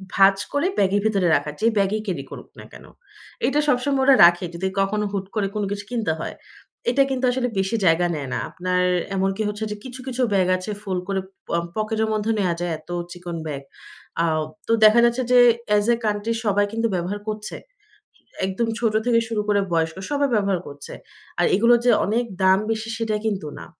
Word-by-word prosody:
ভাঁজ 195 Hz, 0 st, +6 dB, 0.2 s
করে 285 Hz, +5 st, +1 dB
ব্যাগের 200 Hz, +1 st, +2 dB
ভেতরে 195 Hz, -5 st, +2 dB
রাখা। 150 Hz, -, -1 dB
যে, 220 Hz, -, 0 dB
ব্যাগেই 200 Hz, +2 st, +1 dB
ক্যারি 170 Hz, -9 st, -3 dB
করুক -, -, -10 dB
না -, -, -10 dB
কেন। -, -, -12 dB, 0.6 s
এটা 290 Hz, +2 st, +1 dB
সবসময় 270 Hz, 0 st, +1 dB
ওরা 275 Hz, 0 st, +7 dB
রাখে, 175 Hz, +1 st, +4 dB
যদি 180 Hz, +3 st, -2 dB
কখনো 210 Hz, +2 st, 0 dB
হুট 195 Hz, -1 st, -2 dB
করে 205 Hz, -2 st, +1 dB
কোন 210 Hz, -, -1 dB
কিছু 205 Hz, 0 st, -4 dB
কিনতে 225 Hz, -8 st, 0 dB
হয়। -, -, -5 dB, 0.5 s
এটা 275 Hz, +3 st, +4 dB
কিন্তু 260 Hz, -1 st, -1 dB
আসলে 250 Hz, 0 st, -1 dB
বেশি 195 Hz, +4 st, 0 dB
জায়গা 175 Hz, +1 st, +4 dB
নেয় 140 Hz, -3 st, -5 dB
না। -, -, -1 dB
আপনার 180 Hz, 0 st, -1 dB, 0.3 s
এমনকি 195 Hz, +2 st, 0 dB
হচ্ছে 210 Hz, +1 st, -5 dB
যে, 210 Hz, -, -3 dB
কিছু, 255 Hz, 0 st, -9 dB
কিছু 255 Hz, 0 st, -3 dB
ব্যাগ 185 Hz, -2 st, +3 dB
আছে, 185 Hz, +4 st, -6 dB
ফোলড 185 Hz, -3 st, -2 dB
করে 195 Hz, -1 st, -1 dB, 0.3 s
প -, -, -24 dB, 0.3 s
পকেটের 220 Hz, 0 st, -1 dB
মধ্যে 215 Hz, +1 st, 0 dB
নেয়া 180 Hz, -4 st, +1 dB
যায়, 175 Hz, -1 st, -2 dB
এত 155 Hz, -, -22 dB, 0.2 s
চিকন 175 Hz, -1 st, -7 dB
ব্যাগ। 140 Hz, -2 st, -5 dB, 0.6 s
আ 170 Hz, -, +2 dB, 0.4 s
তো -, -, -1 dB
দেখা 215 Hz, +2 st, +7 dB
যাচ্ছে 235 Hz, +2 st, +1 dB
যে, 250 Hz, -, +7 dB, 0.3 s
অ্যাজ 210 Hz, 0 st, +3 dB
এ -, -, +2 dB
কান্ট্রি 210 Hz, +2 st, -1 dB
সবাই 205 Hz, 0 st, +2 dB
কিন্তু 230 Hz, 0 st, 0 dB
ব্যবহার 180 Hz, +4 st, -3 dB
করছে। 215 Hz, 0 st, -4 dB, 0.9 s
একদম 190 Hz, +5 st, -1 dB
ছোট 225 Hz, -3 st, +1 dB
থেকে 235 Hz, -2 st, +4 dB
শুরু 220 Hz, -2 st, -1 dB
করে 205 Hz, -1 st, +3 dB
বয়স্ক, 165 Hz, -1 st, 0 dB, 0.2 s
সবাই 285 Hz, -1 st, +1 dB
ব্যবহার 200 Hz, -4 st, +1 dB
করছে। 145 Hz, 0 st, -10 dB, 0.5 s
আর -, -, +4 dB
এগুলোর 235 Hz, +3 st, +5 dB
যে, 245 Hz, -, +6 dB
অনেক 230 Hz, +4 st, 0 dB, 0.2 s
দাম 190 Hz, +1 st, +5 dB
বেশি, 225 Hz, 0 st, -3 dB
সেটা 225 Hz, -2 st, -1 dB
কিন্তু 200 Hz, -8 st, -2 dB
না। -, -, -9 dB
205 Hz, 195 wpm, -22 LUFS, 185-230 Hz, 0.9 s, ওরা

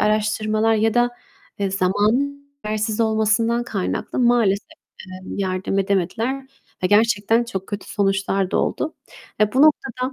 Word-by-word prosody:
araştırmalar 215 Hz, +1 st, +1 dB
ya 220 Hz, 0 st, +1 dB
da, 240 Hz, 0 st, +3 dB, 0.5 s
eee, 200 Hz, -1 st, -1 dB
zamanın 215 Hz, +10 st, 0 dB, 0.2 s
yetersiz 215 Hz, +1 st, -1 dB
olmasından 225 Hz, +1 st, +2 dB
kaynaklı 200 Hz, -6 st, -3 dB
maalesef, 235 Hz, -5 st, +2 dB, 0.4 s
eee, 185 Hz, 0 st, -9 dB, 0.2 s
yardım 190 Hz, 0 st, -1 dB
edemediler 220 Hz, +8 st, -1 dB, 0.4 s
ve -, -, +3 dB
gerçekten 220 Hz, +2 st, +3 dB
çok 195 Hz, -5 st, -5 dB
kötü 205 Hz, -1 st, -6 dB
sonuçlar 195 Hz, -1 st, 0 dB
da -, -, 0 dB
oldu. 315 Hz, -, -1 dB, 0.5 s
Ve 210 Hz, 0 st, +3 dB
bu 265 Hz, -, +5 dB
noktada, 265 Hz, -4 st, +2 dB
215 Hz, 130 wpm, -21 LUFS, 195-235 Hz, 0.5 s, bu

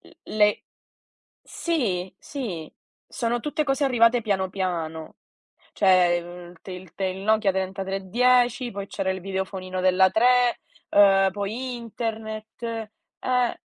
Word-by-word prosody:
l -, -, -18 dB, 0.2 s
le 210 Hz, -1 st, +3 dB, 0.8 s
sì, 190 Hz, -, -2 dB
sì, 200 Hz, -, -6 dB, 0.4 s
sono 235 Hz, 0 st, -1 dB
tutte 300 Hz, +2 st, -1 dB
cose 275 Hz, +1 st, +1 dB
arrivate 235 Hz, -2 st, +4 dB
piano 190 Hz, -3 st, 0 dB
piano. 165 Hz, -4 st, -4 dB, 0.6 s
Cioè, 180 Hz, -3 st, +4 dB
mhmm, 175 Hz, 0 st, -10 dB
il 170 Hz, -, -21 dB
te 190 Hz, -, -8 dB
il 180 Hz, -1 st, -10 dB
te 195 Hz, -, -3 dB
il 185 Hz, 0 st, -3 dB
Nokia 215 Hz, -1 st, +3 dB
3310, 200 Hz, +7 st, +1 dB
poi 200 Hz, 0 st, -6 dB
c'era 195 Hz, -2 st, -2 dB
il 190 Hz, 0 st, -3 dB
videofonino 190 Hz, -1 st, -4 dB
della 185 Hz, 0 st, +5 dB
3, 245 Hz, +3 st, +3 dB, 0.3 s
ehm, 195 Hz, -1 st, +5 dB
poi 225 Hz, +6 st, -4 dB
internet, 220 Hz, -1 st, -6 dB
eh, 230 Hz, +2 st, -3 dB
200 Hz, 125 wpm, -25 LUFS, 185-235 Hz, 0.8 s, della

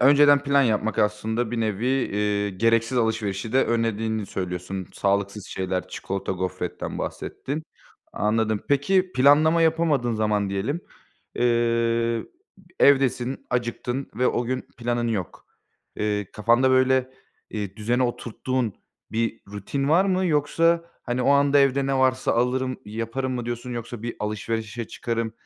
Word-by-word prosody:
önceden 145 Hz, +1 st, +6 dB
plan 140 Hz, 0 st, +3 dB
yapmak 110 Hz, -2 st, 0 dB
aslında 110 Hz, +2 st, 0 dB
bir 120 Hz, -1 st, -2 dB
nevi, 110 Hz, +1 st, -1 dB
eee, 105 Hz, -6 st, 0 dB
gereksiz 115 Hz, +5 st, +2 dB
alışverişi 110 Hz, -2 st, -1 dB
de 135 Hz, +1 st, +4 dB
önlediğini 110 Hz, -2 st, -1 dB
söylüyorsun. 90 Hz, 0 st, -4 dB
Sağlıksız 100 Hz, 0 st, -1 dB
şeyler, 95 Hz, -1 st, -3 dB
çikolata, 95 Hz, +1 st, -4 dB
gofretten 90 Hz, -1 st, -4 dB
bahsettin. 150 Hz, +4 st, -4 dB, 0.5 s
Anladım. 110 Hz, 0 st, 0 dB
Peki 185 Hz, +7 st, +2 dB
planlama 155 Hz, +5 st, +5 dB
yapamadığın 155 Hz, -7 st, +2 dB
zaman 105 Hz, -2 st, 0 dB
diyelim, 110 Hz, -, -2 dB, 0.5 s
eee, 115 Hz, -1 st, +1 dB, 0.4 s
b 190 Hz, -, -19 dB, 0.2 s
evdesin, 135 Hz, -2 st, +2 dB
acıktın 125 Hz, +2 st, -2 dB
ve 125 Hz, +3 st, +1 dB
o 120 Hz, -, +1 dB
gün 130 Hz, +2 st, -2 dB, 0.2 s
planın 120 Hz, 0 st, -1 dB
yok. 100 Hz, -7 st, -4 dB, 0.5 s
Eee, 105 Hz, -2 st, -1 dB
kafanda 120 Hz, +4 st, +3 dB
böyle, 130 Hz, 0 st, +3 dB, 0.4 s
eee, 100 Hz, -3 st, -5 dB
düzene 120 Hz, +4 st, 0 dB
oturttuğun 120 Hz, -1 st, -2 dB, 0.4 s
bir 115 Hz, 0 st, -1 dB
rutin 105 Hz, +8 st, -3 dB
var 170 Hz, +5 st, +5 dB
mı? 185 Hz, -1 st, +1 dB
Yoksa, 165 Hz, +2 st, +2 dB, 0.2 s
hani, 125 Hz, 0 st, -2 dB
o 135 Hz, -, +3 dB
anda 140 Hz, 0 st, +4 dB
evde 140 Hz, 0 st, +3 dB
ne 135 Hz, -, +1 dB
varsa 130 Hz, 0 st, +2 dB
alırım, 130 Hz, +2 st, 0 dB
yaparım 115 Hz, +5 st, -3 dB
mı 120 Hz, -1 st, -4 dB
diyorsun? 120 Hz, +1 st, -4 dB
Yoksa 120 Hz, -1 st, -6 dB
bir 120 Hz, 0 st, -4 dB
alışverişe 110 Hz, +2 st, -3 dB
çıkarım, 115 Hz, -2 st, -3 dB
120 Hz, 135 wpm, -24 LUFS, 105-130 Hz, 0.5 s, önceden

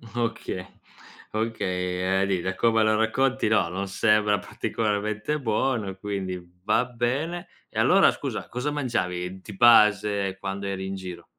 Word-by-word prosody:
Okay, 115 Hz, -6 st, -2 dB, 0.7 s
okay, 95 Hz, -4 st, -1 dB
uhm, -, -, +3 dB
di 95 Hz, -2 st, +1 dB
da 95 Hz, +2 st, -2 dB
come 115 Hz, +1 st, +3 dB
lo 110 Hz, 0 st, +3 dB
racconti, 130 Hz, +4 st, +1 dB
no, 110 Hz, -, +3 dB
non 95 Hz, +3 st, -4 dB
sembra 105 Hz, +1 st, +2 dB
particolarmente 110 Hz, +5 st, -2 dB
buono, 115 Hz, -2 st, 0 dB
e 95 Hz, -, -8 dB
quindi, 95 Hz, -2 st, -4 dB, 0.2 s
va 125 Hz, -, +2 dB
bene; 130 Hz, +9 st, -2 dB, 0.2 s
e -, -, -5 dB
allora, -, -, +6 dB
scusa, -, -, -5 dB
cosa 125 Hz, +4 st, -3 dB
mangiavi 95 Hz, -10 st, -2 dB
di 105 Hz, +1 st, -10 dB
base 105 Hz, -4 st, +5 dB
quando 95 Hz, +1 st, -4 dB
eri 95 Hz, -1 st, -3 dB
in 95 Hz, -, -4 dB
giro? 90 Hz, -3 st, -8 dB
105 Hz, 150 wpm, -25 LUFS, 95-115 Hz, 0.7 s, allora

